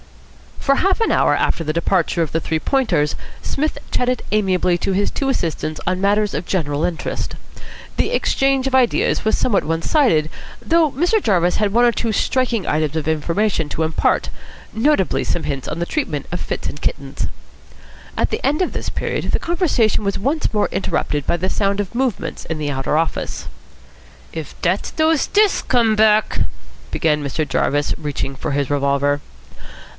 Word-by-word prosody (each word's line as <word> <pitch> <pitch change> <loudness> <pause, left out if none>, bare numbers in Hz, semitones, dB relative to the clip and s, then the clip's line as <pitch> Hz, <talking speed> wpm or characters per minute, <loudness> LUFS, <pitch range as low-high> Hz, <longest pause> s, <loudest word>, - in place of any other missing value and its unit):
For 275 - +2
half 385 +7 +2
an 450 - +2
hour - - +3
after 165 - 0
the 155 -1 -2
departure 170 0 +1
of 160 - -4
the 165 - 0
Three 160 0 -1
Pointers 155 - +1 0.3
Psmith 305 +3 -1
chatted 250 0 0
amiably 185 -4 +2
to 195 - -1
his 200 +2 +1
two 275 - -1
assistants 160 - -2
on 185 +1 0
matters 205 +1 +2
of 160 - -3
general 150 -5 -1
interest. 170 -3 -3 0.6
The - - +1
exchange 270 -1 +2
of 270 - -3
ideas 255 -2 +2
was 220 - +2
somewhat 215 -6 +2
one 165 +1 -1
sided, 195 - +3 0.3
though 330 -3 +2
Mr. 350 - +2
Jarvis 180 - +2
had 210 -2 +1
one 240 +2 +5
or 240 - +5
two 230 -1 -1
striking 240 -1 0
items 155 0 0
of 160 -2 -2
information 165 +2 0
to 160 - -1
impart, 160 0 +1 0.4
notably 225 -3 +2
some 175 - -1
hints 140 -3 -3
on 150 - -3
the 170 - 0
treatment 165 - -2
of 175 - -2
fits - - -4
in - - -7
kittens. 140 -2 -3 0.9
At - - +2
the - - -2
end 295 +5 +2
of - - -2
this - - -4
period - - -2
the - - +1
conversation 325 - +1
was 200 -1 0
once 280 +9 0
more 210 - +1
interrupted 145 -6 -1
by - - +2
the 185 +2 -1
sound 200 0 0
of 205 0 -3
movements 235 -9 -2
in 160 - -3
the 145 -1 -1
outer 135 +2 0
office. 165 0 -2 0.8
"If 160 -3 -7
dat's 180 +3 0
dose 315 -1 +2
stiffs 415 -1 +3
come 230 -4 +2
back 215 0 +3 0.3
" - - -22
began 150 -3 +1
Mr. 145 +2 -2
Jarvis, 145 +1 +1
reaching 145 -2 -3
for 135 - -4
his 140 -1 0
revolver. 145 0 +1
185 Hz, 180 wpm, -20 LUFS, 155-250 Hz, 0.9 s, one